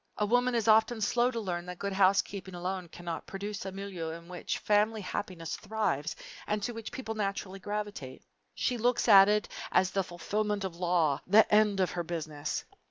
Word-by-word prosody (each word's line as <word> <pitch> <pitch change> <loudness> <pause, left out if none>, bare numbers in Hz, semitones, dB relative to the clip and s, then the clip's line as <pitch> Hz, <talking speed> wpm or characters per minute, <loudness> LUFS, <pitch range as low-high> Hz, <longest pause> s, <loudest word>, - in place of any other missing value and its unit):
A 210 - +1
woman 245 +3 +2
is 230 -1 0
often 220 +1 +5
slow 240 +3 +2
to 235 -2 -3
learn 180 -4 -3
that 180 0 -6
good 200 +1 -3
housekeeping 190 -1 +2
alone 180 0 -3
cannot 170 0 -6
produce 200 0 -5
a - - -4
milieu 190 -4 -5
in 170 +1 -8
which 180 0 -3
family 215 +1 +2
happiness 180 -3 -4
thrives 200 -8 -2 0.3
and 210 -1 -1
to 240 - -1
which 225 -1 -7
people 225 -4 -5
naturally 195 -2 -3
gravitate. 205 -10 -5 0.3
She 245 -2 -1
looks 245 +2 +2
at 200 -2 +9
it 210 0 +2 0.2
as 185 0 +3
the 195 - +1
fulfillment 205 +3 -2
of 190 -3 -3
the 170 - -15
law 170 -5 +2
the 210 +4 +7
end 210 -2 +4
of 185 - +2
her 175 - -2
Business. 155 -3 -4
195 Hz, 190 wpm, -30 LUFS, 175-215 Hz, 0.3 s, at